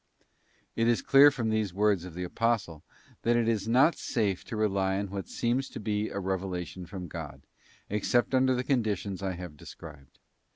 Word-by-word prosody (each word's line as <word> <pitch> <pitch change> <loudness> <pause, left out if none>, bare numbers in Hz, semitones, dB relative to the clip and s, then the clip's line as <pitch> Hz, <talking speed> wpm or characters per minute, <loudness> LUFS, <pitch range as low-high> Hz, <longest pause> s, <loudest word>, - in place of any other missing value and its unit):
t - - -2
It 115 - +3
is 120 -1 +2
clear 140 +1 +8
from 115 -6 -2
these 105 -4 -1
words 100 -3 +2
of 90 -3 -9
the 90 - -4
Apostle, 100 -5 -1 0.4
that 120 +1 +2
it 120 -1 +2
is 110 -3 0
not 130 +8 +4
safe 100 -6 -1
to - - -6
rely 95 -3 +1
on 100 -1 -3
what 100 -1 -5
seems 125 +3 -1
to - - -7
be 105 0 -1
a - - -6
revelation 95 -2 -4
from 90 0 -7
God, - - -8 0.4
except 115 +5 +1
under 130 0 +3
the 125 - -1
conditions 105 -7 -1
I 95 -1 -2
have 90 -3 -8
described. 70 -2 -12
105 Hz, 190 wpm, -29 LUFS, 95-115 Hz, 0.4 s, clear